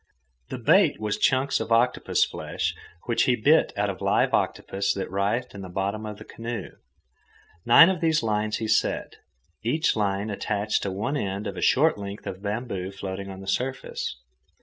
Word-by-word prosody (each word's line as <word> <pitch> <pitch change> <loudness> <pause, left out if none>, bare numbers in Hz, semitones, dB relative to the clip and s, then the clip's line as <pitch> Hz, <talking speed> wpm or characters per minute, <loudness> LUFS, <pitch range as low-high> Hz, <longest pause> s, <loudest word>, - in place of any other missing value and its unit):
The - - -4
bait - - +4
was 105 -1 -2
chunks 135 +1 +2
of - - -5
octopus 120 +2 +3
flesh, - - -3 0.3
which 115 - +2
he 125 - +3
bit 145 +8 +4
out 100 0 +1
of 90 - -10
a - - -5
live - - +2
octopus 100 0 0
that 95 -2 -4
writhed 100 +6 -1
in 100 - -8
the 95 - -8
bottom 100 +4 -2
of 105 -1 -7
the - - -10
canoe. 115 -3 -6 1.0
Nine 140 +8 +9
of 185 -3 0
these 160 -4 +2
lines 105 -1 0
he 110 - -3
set, 110 - 0 0.4
each 150 +9 +1
line 100 0 -1
attached 105 +1 -1
to 100 - -2
one 105 +9 -2
end 100 -4 -3
of - - -4
a - - -5
short 150 -3 +3
length 100 +1 -7
of 95 - -6
bamboo 100 -3 -3
floating 100 0 -6
on 95 0 -8
the 95 - -10
surface. 130 - -2
105 Hz, 185 wpm, -25 LUFS, 100-120 Hz, 1.0 s, Nine